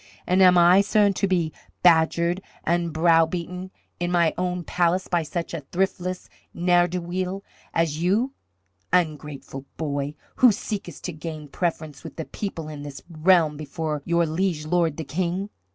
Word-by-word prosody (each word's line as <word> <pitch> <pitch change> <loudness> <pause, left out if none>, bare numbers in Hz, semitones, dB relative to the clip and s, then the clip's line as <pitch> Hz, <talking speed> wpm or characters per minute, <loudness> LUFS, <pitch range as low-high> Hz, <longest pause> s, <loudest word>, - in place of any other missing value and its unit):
"And 185 +1 +3
am 180 -1 +7
I, 175 +3 +7
sirrah, 205 0 +3
to 200 - 0
be 175 -4 0 0.3
badgered 170 +1 +4 0.2
and 170 0 0
browbeaten 170 +3 +1 0.3
in 175 0 -1
my 170 -2 +3
own 180 -1 -2
palace 180 +2 +1
by 175 -1 +1
such 170 +2 -4
a 165 - -3
thriftless 185 +3 -2 0.3
ne'er 175 0 +3
do 180 +1 -3
weel 185 +2 -3 0.3
as 160 -2 0
you, 215 +10 +1 0.6
ungrateful 150 -5 -1
boy, 145 -2 -2 0.2
who 250 -2 +7
seekest 200 - -5
to 180 - -4
gain 155 -1 -7
preference 155 -3 -3
with - - -9
the 160 - -5
people 170 -6 -5
in 150 -2 -7
this 145 -1 -8
realm 160 -2 +3
before 155 0 -4
your 170 +1 +2
liege 160 -1 -1
lord 165 -2 +1
the 160 - -3
King? 180 +6 -2
170 Hz, 155 wpm, -24 LUFS, 155-180 Hz, 0.6 s, am